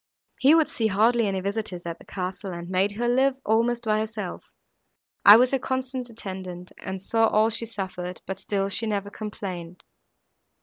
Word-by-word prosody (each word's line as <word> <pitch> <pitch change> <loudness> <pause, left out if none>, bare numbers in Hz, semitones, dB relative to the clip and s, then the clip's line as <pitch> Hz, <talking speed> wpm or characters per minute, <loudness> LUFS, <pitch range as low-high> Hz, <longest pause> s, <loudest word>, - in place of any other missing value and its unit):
He 280 +4 +6
would 320 -2 +4
see 225 - 0
hardly 225 +3 +3
any 190 -1 -1
visitors 200 -3 -3
at 170 -1 -5
the - - -16
castle, 190 +1 -5
and 170 0 -6
made 190 +2 +2
her 240 +3 -1
live 260 +2 +3
almost 235 +2 +2
by 215 -1 +2
herself. 215 -4 -4 0.8
I 205 +2 +11
was 250 +1 +4
her 270 - +1
constant 260 -1 -3
attendant, 185 -5 -7
and 190 0 -5
saw 225 +4 +2
all 215 +1 +3
she 230 +1 -1
suffered, 185 -4 -5
but 190 0 -5
still 195 0 -1
she 225 +3 -1
never 205 -1 -2
complained. 185 -5 -7
210 Hz, 175 wpm, -25 LUFS, 190-230 Hz, 0.8 s, I